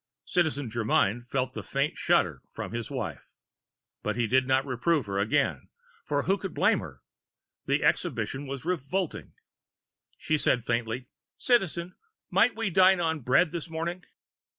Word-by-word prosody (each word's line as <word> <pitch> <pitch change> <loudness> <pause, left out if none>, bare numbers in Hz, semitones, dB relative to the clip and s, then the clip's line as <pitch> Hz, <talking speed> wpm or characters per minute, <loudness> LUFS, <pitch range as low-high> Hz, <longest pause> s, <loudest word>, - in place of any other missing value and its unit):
Citizen 145 -8 0
Germyn 115 0 +1
felt 130 0 -2
a - - -3
faint 140 +2 -1
shudder - - +1
from - - -5
his 115 -1 -4
wife. - - -5 0.7
But - - -2
he 120 -1 +1
did 130 +3 +2
not 135 0 +2
reprove 140 +2 +1
her 100 -1 -2
again, 100 +2 0 0.3
for 145 -1 0
who 195 +1 +1
could 190 -4 -6
blame - - +3
her? - - -10 0.6
The - - +1
exhibition 140 +1 0
was 135 +1 -6
revolting. 180 +1 -2 0.8
She 155 -1 0
said 125 -4 +2
faintly: 120 +1 -1 0.3
"Citizen, 185 -7 +1 0.4
might 245 - +4
we 225 -4 -1
dine 190 +1 +6
on 160 -2 0
bread 140 +6 +3
this 170 -1 -5
morning?" 170 +3 -4
145 Hz, 150 wpm, -28 LUFS, 125-175 Hz, 0.8 s, dine